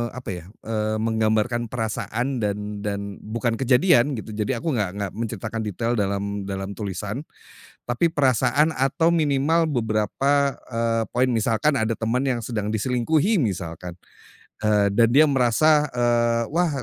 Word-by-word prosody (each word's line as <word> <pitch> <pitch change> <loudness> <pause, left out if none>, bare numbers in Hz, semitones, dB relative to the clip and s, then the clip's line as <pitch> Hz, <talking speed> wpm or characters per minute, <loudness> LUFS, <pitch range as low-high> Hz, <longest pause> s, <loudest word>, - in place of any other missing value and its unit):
apa 125 - -7
ya, 85 -2 -9 0.2
eee, 110 -1 -1
menggambarkan 110 +1 +1
perasaan 120 +2 -2
dan 105 0 -3
dan 100 -1 -4
bukan 115 +1 -2
kejadian 135 +2 +3
gitu, 110 - -9
jadi 110 +3 -2
aku 165 - -1
enggak 100 -4 -1
enggak 100 -2 -3
menceritakan 115 0 -4
detail 115 +4 -2
dalam 100 0 -2
dalam 95 0 -4
tulisan. 105 - -4 0.6
Tapi 125 +8 +1
perasaan 135 +1 +2
atau 150 +5 +2
minimal 155 +1 +2
beberapa, 135 +4 0
eee, 115 -1 0
poin, 130 +1 +3
misalkan 115 +6 +1
ada 110 0 0
teman 115 +2 -1
yang 125 -3 0
sedang 105 -3 -3
diselingkuhi 130 - +1
misalkan, 90 - -3 0.7
eee, 105 -1 +3
dan 115 +3 +4
dia 150 +3 +7
merasa, 145 +4 +3
eee, 120 -1 +1
wah 155 -4 0
115 Hz, 140 wpm, -23 LUFS, 105-135 Hz, 0.7 s, dia